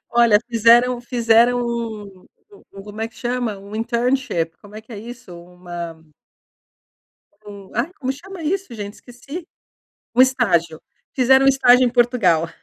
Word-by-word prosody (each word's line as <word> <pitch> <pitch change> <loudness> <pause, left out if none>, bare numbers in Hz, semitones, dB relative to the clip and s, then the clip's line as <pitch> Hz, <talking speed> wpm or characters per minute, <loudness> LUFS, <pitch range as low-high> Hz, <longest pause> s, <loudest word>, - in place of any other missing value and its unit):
Olha, 235 -3 +5
fizeram 240 +2 +4
fizeram 240 0 +3
um 220 -5 -5 0.2
um 405 - -19
um 195 0 -11
como 210 +1 -10
é 225 - -2
que 225 - -28
chama? 240 -3 -3
Um 200 +2 -11
internship, 235 -8 -1
como 205 0 -16
é 215 - -7
que 225 +2 -15
é 205 - -7
isso? 240 -4 -11
Uma 175 -1 -8 1.5
um 200 -2 -11
ai, 250 +10 -1
como 265 -1 -2
chama 355 +6 -10
isso, 370 -4 -2
gente? 205 -2 -7
Esqueci! 275 +8 -10 0.7
Um 250 - +6
estágio. 180 - +1 0.3
Fizeram 265 0 +4
estágio 255 -2 +5
em 240 - +1
Portugal. 230 -10 +2
235 Hz, 145 wpm, -20 LUFS, 205-250 Hz, 1.5 s, Um